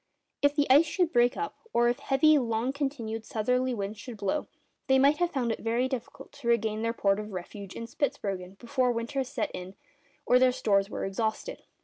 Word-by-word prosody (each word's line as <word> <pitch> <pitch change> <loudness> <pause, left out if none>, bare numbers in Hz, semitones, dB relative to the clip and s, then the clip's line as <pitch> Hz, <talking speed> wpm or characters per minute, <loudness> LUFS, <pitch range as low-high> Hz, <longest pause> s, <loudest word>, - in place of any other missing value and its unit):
If 285 0 +3
the 290 -1 +2
ice 290 +5 +6
should 355 0 0
break 240 0 +3
up, 425 - -4 0.2
or 240 0 +4
if 240 +3 0
heavy 280 +3 +4
and 260 -6 +2
long 230 +4 0
continued 255 -6 -3
southerly 250 +4 0
winds 205 0 -4
should 230 +1 -8
blow, 205 +9 -1 0.4
they 265 - +5
might 280 +3 +4
have 350 -1 +1
found 255 -7 -1
it - - -3
very 235 +3 0
difficult 260 +1 -6
to 270 -4 -9
regain 220 -2 +1
their 230 0 0
port 200 -3 +1
of 210 -1 -7
refuge 190 +2 -7
in 230 - -5
Spitzbergen 200 -8 -3
before 250 +2 0
winter 235 +4 -2
set 255 -3 -3
in 185 +1 -7 0.5
or 250 - +5
their 255 0 +5
stores 200 -6 +1
were - - -3
exhausted. 220 - -3
240 Hz, 205 wpm, -28 LUFS, 215-270 Hz, 0.5 s, ice